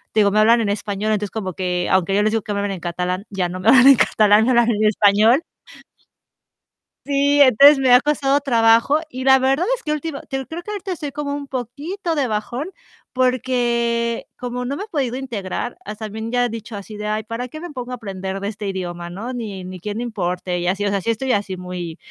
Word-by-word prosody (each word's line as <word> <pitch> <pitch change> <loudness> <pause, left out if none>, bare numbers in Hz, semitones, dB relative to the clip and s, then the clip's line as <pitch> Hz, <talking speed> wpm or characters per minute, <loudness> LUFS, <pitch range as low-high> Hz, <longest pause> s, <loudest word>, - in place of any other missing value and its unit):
digo, 205 -2 +4
me 215 - +2
hablan 230 +2 +5
en 210 - -1
español, 205 +1 -2
entonces 210 -1 -1
como 190 -5 -4
que 180 -1 -2
aunque 190 +1 +2
yo 205 - +3
les 215 - +2
digo 225 0 0
que 205 - -5
me 200 - -2
hablen 200 0 -2
en 190 - -7
catalán, 180 +3 -3
ya 190 -3 -2
no 185 +1 -6
me 185 - -4
hablan 260 +2 +7
en 275 - +9
catalán, 215 0 +4
me - - +1
hablan 240 -1 +4
en 215 0 0
español. 215 +6 +4 1.6
Sí, 285 0 +2
entonces 280 +2 +7
me 260 -2 +4
ha 250 - +7
costado 285 -1 +1
trabajo 230 +2 +3
y 255 -1 -6
la 265 0 +6
verdad 270 +6 +1
es - - -17
que 300 - -1
última 305 -1 -4
te 270 - -4
digo 265 - -6
creo 330 +2 -5
que 420 - -8
ahorita 400 -2 -5
estoy 305 -5 -5
como 290 -1 -3
un 285 -1 -6
poquito 290 - -4
de 280 -4 0
bajón 240 - -3 0.4
porque 240 -2 0
como 250 0 -4
no 275 +3 -3
me 345 - -5
he - - -9
podido 275 - -2
integrar, 240 -3 -5
as 210 +1 -7
también 220 +1 -5
ya 245 0 +2
he - - -2
dicho 225 0 -7
así 205 +1 -8
de: 210 0 -5
"Ay, 215 +1 -1
¿para 230 +3 -5
qué 310 +5 -9
me 350 -1 -7
pongo 250 -3 -7
a - - -3
aprender 195 -4 -5
de 200 - -2
este 210 -1 -6
idioma, 175 -3 -5
no? 205 +8 -6
Ni, 210 -6 -6
ni 185 0 -8
quien 205 +4 -5
le 235 - -3
importe", 180 -5 -3
y 175 - -2
así, 195 +3 0
o - - +1
sea, 200 -1 -1
sí 205 - -3
estoy 255 +4 -1
así 200 -4 -1
muy 180 -2 -6
230 Hz, 240 wpm, -20 LUFS, 200-265 Hz, 1.6 s, en